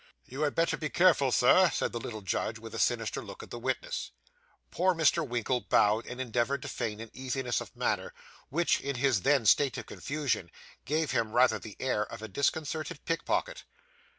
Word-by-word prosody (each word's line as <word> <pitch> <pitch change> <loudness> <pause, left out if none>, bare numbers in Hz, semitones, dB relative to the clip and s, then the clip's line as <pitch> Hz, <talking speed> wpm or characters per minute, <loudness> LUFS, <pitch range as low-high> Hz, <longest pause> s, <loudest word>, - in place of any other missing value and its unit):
'You 135 +4 -7
had 150 -1 +1
better 165 0 +1
be 155 - -3
careful, 165 -7 +4
Sir,' 180 +11 +5
said - - -1
the 120 - -4
little 110 -2 -6
judge, 95 - -2
with - - -10
a - - -4
sinister - - 0
look - - -9
at - - -13
the 120 - -5
witness. 130 +1 -3 0.6
Poor 185 +1 +2
Mr. 165 +1 +3
Winkle 120 +1 -1
bowed, 105 +2 +2
and 125 - -7
endeavoured 125 +2 -1
to - - -5
feign 105 -2 -3
an 115 -1 -8
easiness 130 -1 -2
of - - -10
manner, - - -1 0.4
which, 170 +5 +1
in 140 0 -3
his 125 -5 +2
then 135 -2 +3
state 135 +4 +4
of 120 - -6
confusion, 140 - -2 0.4
gave 155 +2 0
him 110 -1 0
rather 125 +1 +4
the 110 -3 -10
air 130 -5 0
of 110 +1 -9
a - - -4
disconcerted 145 - -2
pickpocket. - - -1
130 Hz, 190 wpm, -30 LUFS, 120-155 Hz, 0.6 s, Sir